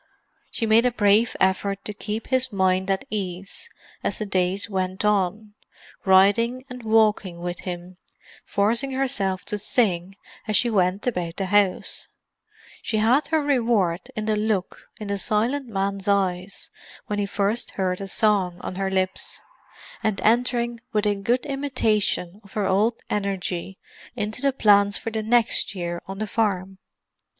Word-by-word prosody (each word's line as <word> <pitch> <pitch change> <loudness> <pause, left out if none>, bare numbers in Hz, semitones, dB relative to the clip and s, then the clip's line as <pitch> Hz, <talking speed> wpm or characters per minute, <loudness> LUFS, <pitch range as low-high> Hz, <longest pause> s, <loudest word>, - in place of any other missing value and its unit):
She 230 - -1
made 225 +3 +5
a - - +1
brave 215 0 +3
effort 195 +1 +1
to 210 - -4
keep 210 +2 -4
his 260 -1 +2
mind 190 -1 +1
at 195 0 0
ease 195 -2 -5 0.3
as - - -1
the 215 - -3
days 190 0 0
went 190 0 -2
on; 210 +1 0 0.5
riding 205 +7 +4
and 250 0 -7
walking 215 -5 +2
with 175 0 -4
him, 180 0 -7 0.5
forcing 230 +7 0
herself 220 -9 -1
to 210 - -3
sing 195 -4 0 0.3
as 215 -2 +2
she 240 +2 +1
went 190 -1 +1
about 180 -9 -2
the 195 - -1
house—she 205 +2 -2
had 250 +7 +3
her 315 -1 +1
reward 225 -11 +1
in 215 - -3
the 215 0 +1
look 210 -3 -2
in 210 - -6
the 200 0 -2
silent 240 +8 0
man's 195 -2 -2
eyes 190 -1 -1 0.3
when 205 0 -2
he 200 - 0
first 205 +4 -1
heard 185 -1 -1
a 195 - -4
song 195 -4 +1
on - - -5
her 195 0 0
lips—and 190 - -4
entering 235 +1 +1
with 210 0 +1
a 205 - +3
good 235 +5 0
imitation 220 -9 -1
of 200 - -18
her 210 -2 0
old 205 +5 +2 0.2
energy 195 -2 -2 0.4
into 215 +1 -3
the 280 0 +3
plans 205 -5 +4
for 225 - -5
the 220 0 -2
next 225 -2 +1
year 175 -1 -4
on 195 0 -6
the 215 - -2
farm. 195 -3 -1
205 Hz, 155 wpm, -24 LUFS, 190-225 Hz, 0.5 s, made